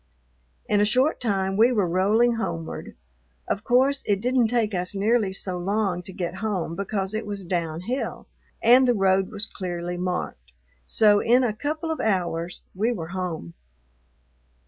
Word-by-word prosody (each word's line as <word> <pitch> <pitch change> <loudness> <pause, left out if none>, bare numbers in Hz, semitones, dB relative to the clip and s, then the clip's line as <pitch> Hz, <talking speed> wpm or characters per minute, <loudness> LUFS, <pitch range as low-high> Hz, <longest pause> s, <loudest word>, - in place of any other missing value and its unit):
In 205 -1 +2
a - - +5
short 255 +9 +2
time 195 -4 0
we 230 +4 +5
were 205 -7 +1
rolling 210 +7 +3
homeward. 165 -8 -5 0.5
Of 200 - -2
course 265 +4 +3
it 200 -2 +2
didn't 250 +1 +2
take 225 -2 0
us 180 +2 -2
nearly 210 0 +2
so 185 -1 -4
long 195 -1 -1
to 185 - -8
get 180 0 -4
home 190 -6 -2
because 195 0 -2
it 220 +1 -2
was 200 -2 -5
downhill 175 - -3 0.4
and 250 +3 +6
the 245 - +3
road 190 -1 +2
was 210 0 -1
clearly 175 -3 -5
marked, 175 - -4 0.3
so 205 - +5
in 250 +3 +4
a 230 -4 +1
couple 305 +7 -3
of 320 - -3
hours 175 -4 -1
we 215 +6 0
were 170 -8 -5
home. 175 - -4
200 Hz, 160 wpm, -24 LUFS, 180-230 Hz, 0.5 s, and